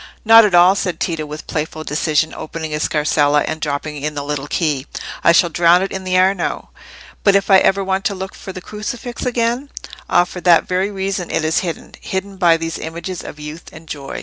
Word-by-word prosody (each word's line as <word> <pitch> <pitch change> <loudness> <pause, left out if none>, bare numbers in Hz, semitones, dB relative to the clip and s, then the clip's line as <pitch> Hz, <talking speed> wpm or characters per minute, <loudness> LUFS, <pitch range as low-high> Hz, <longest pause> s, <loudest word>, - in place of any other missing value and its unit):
"Not 225 0 +8
at 195 -4 +2
all!" 175 +2 +7
said 185 -3 -3
Tito, 160 -3 -2
with 150 +1 -8
playful 155 0 -4
decision, 155 +1 0
opening 160 0 -6
his 150 0 -2
scarsella 150 -1 +2
and 155 - -4
dropping 150 0 -3
in 150 +1 -3
the 145 - -3
little 145 0 -4
key. 150 -4 -1 0.4
"I - - +6
shall 170 0 +4
drown 175 +2 +4
it 195 - -4
in 190 -1 -5
the 185 0 +1
Arno." 185 -1 0 0.5
"But 200 -1 +4
if 200 0 +2
I 190 - +8
ever 195 +1 +2
wanted 190 0 -1
to 200 - 0
look 190 0 -6
at 190 - -6
the 185 - -6
crucifix 235 +5 -5
again?" 240 +3 -1 0.4
"Ah! 175 - +5
for 180 0 -8
that 175 -2 +4
very 185 +2 0
reason 195 -2 -3
it 155 - -1
is 160 - +2
hidden—hidden 190 +2 -5
by 170 -3 +4
these 165 0 -4
images 170 +2 -6
of 150 - -9
youth 150 +3 -8
and 160 +1 -13
joy." 140 -3 -6
175 Hz, 210 wpm, -18 LUFS, 155-190 Hz, 0.5 s, Not